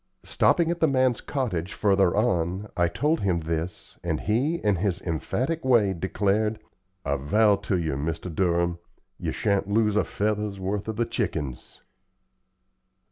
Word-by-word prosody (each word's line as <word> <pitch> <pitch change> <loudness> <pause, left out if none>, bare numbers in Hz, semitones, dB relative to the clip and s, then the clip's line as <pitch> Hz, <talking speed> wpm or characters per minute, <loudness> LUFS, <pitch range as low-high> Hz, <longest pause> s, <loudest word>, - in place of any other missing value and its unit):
Stopping 170 -2 +2
at 170 - -3
the 160 - +4
man's 130 -3 +2
cottage 105 - -2
further 95 -3 +2
on, 95 -2 0
I 90 -3 +3
told 150 - 0
him 90 -4 0
this, 80 +2 -5
and - - -1
he, 125 - +1
in 105 - +1
his 95 0 -1
emphatic 125 - -2
way, 115 -7 +4
declared: 100 +4 0 0.5
"I 70 0 0
vow 105 +9 +3
ter 100 -1 -2
you, 80 -4 -1
Mr. 80 +5 -3
Durham, 85 0 +1 0.4
ye - - -2
shan't 100 -1 0
lose 105 0 +2
a 105 - +3
feather's 105 -1 -2
worth 100 +3 -3
o' - - -1
the 115 +2 0
chickens." 70 - -4
100 Hz, 150 wpm, -26 LUFS, 85-110 Hz, 0.5 s, the